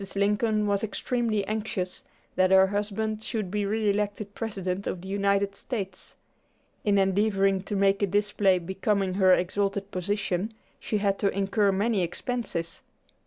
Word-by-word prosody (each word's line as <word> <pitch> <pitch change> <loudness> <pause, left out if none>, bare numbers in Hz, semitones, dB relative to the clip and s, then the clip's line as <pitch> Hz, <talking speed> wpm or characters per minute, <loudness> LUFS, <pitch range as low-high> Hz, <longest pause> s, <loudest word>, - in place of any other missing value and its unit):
Lincoln 210 +2 +2
was 200 0 0
extremely 220 -1 -1
anxious 210 -4 -3 0.3
that 185 0 +4
her 190 0 +7
husband 210 +2 -2
should 215 -6 -3
be 205 -1 -1
re 215 +1 0
elected 205 0 -1
President 195 -4 -3
of 175 - -3
the 190 - -9
United 200 0 +1
States. 195 -6 -6 0.7
In 205 -1 +3
endeavoring 195 0 +2
to 200 +2 -4
make 195 0 +3
a 200 - +3
display 200 -1 +2
becoming 190 +2 -1
her 190 -1 +4
exalted 200 +2 -1
position, 200 +2 -2 0.2
she 215 - -1
had 200 -1 0
to 200 - +2
incur 200 +1 +1
many 205 +1 +1
expenses. 175 -2 -3
Mr. - - -43
200 Hz, 150 wpm, -27 LUFS, 190-210 Hz, 0.7 s, her